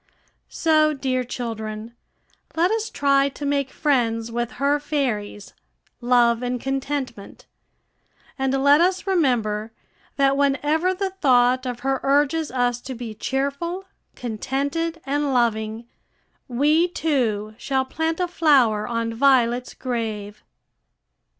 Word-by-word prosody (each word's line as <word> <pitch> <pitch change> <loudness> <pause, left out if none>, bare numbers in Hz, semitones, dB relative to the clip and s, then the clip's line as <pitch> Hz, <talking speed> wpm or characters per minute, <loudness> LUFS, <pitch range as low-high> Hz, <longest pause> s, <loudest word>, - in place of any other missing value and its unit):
So, 310 -1 +3
dear 260 -2 -1
children, 225 -2 -6 0.6
let 345 +4 +2
us 445 0 -1
try 275 -1 +2
to 285 +1 -7
make 280 -1 0
friends 235 -7 0
with 240 0 -3
her 285 +2 +1
fairies, 245 -9 -3 0.5
Love 240 -1 +3
and 250 0 -2
Contentment, 270 -4 -4 0.9
and 270 0 0
let 285 +3 +6
us 370 +2 +1
remember 235 - 0 0.4
that 275 -1 +3
whenever 295 +6 +1
the 385 0 -2
thought 255 -7 +3
of 245 -1 -5
her 270 +1 0
urges 290 +3 +2
us 245 -1 0
to 260 0 -7
be 230 -2 -6
cheerful, 280 - -3 0.3
contented, 280 +8 -3
and 280 0 0
loving, 225 -1 0 0.6
we, 300 +7 +3
too, 240 -11 -1
shall 265 -1 0
plant 320 +5 -2
a 360 - +1
flower 265 -11 +3
on 230 -1 -2
Violet's 250 -1 +2
grave. 215 -4 -4
265 Hz, 120 wpm, -23 LUFS, 235-290 Hz, 0.9 s, let